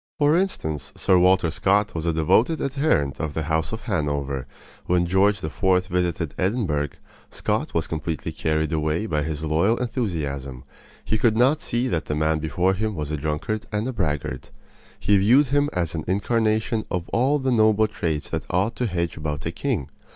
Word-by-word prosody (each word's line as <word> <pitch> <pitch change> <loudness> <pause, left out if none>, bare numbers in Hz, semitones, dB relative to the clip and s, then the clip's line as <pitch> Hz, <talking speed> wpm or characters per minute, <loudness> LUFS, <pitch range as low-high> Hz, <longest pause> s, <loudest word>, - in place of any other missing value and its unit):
For 145 +1 +4
instance, 80 - -1
Sir 90 - +4
Walter 90 -2 +4
Scott 100 +5 +1
was 80 0 -3
a - - +3
devoted 110 - +2
adherent 135 - 0
of 75 -3 -3
the 80 - -1
house 80 +1 -1
of 110 - -5
Hanover. 70 - -2 0.4
When 90 0 +2
George 100 +3 +2
IV. 80 - -6 0.2
visited 90 -3 -1
Edinburgh, 90 - 0 0.4
Scott - - -2
was - - +1
completely 80 0 -3
carried 80 0 -1
away 80 +5 0
by 75 -8 0
his 75 0 -3
loyal 85 +9 +2
enthusiasm. 75 - -3 0.4
He 110 - 0
could 110 -1 +3
not 135 +6 +3
see 120 +2 -1
that 80 -10 -1
the 75 - -2
man 80 +1 +1
before 85 +5 +1
him 105 +2 -2
was 75 -2 -4
a - - 0
drunkard 80 +9 -3
and 110 +5 -2
braggart. 75 - -3 0.5
He 100 -1 +3
viewed 125 +8 +5
him 145 +1 +2
as 85 -3 -2
an 80 -2 -3
incarnation 110 +3 +1
of 90 -1 -3
all 130 +5 +2
the 130 -2 -1
noble 110 -2 +4
traits 80 -8 -3
that - - -3
ought 95 +6 0
to 125 - 0
hedge 85 -4 -2
about 75 -2 -4
a 80 - -1
king. 100 - -2
90 Hz, 180 wpm, -24 LUFS, 80-110 Hz, 0.5 s, viewed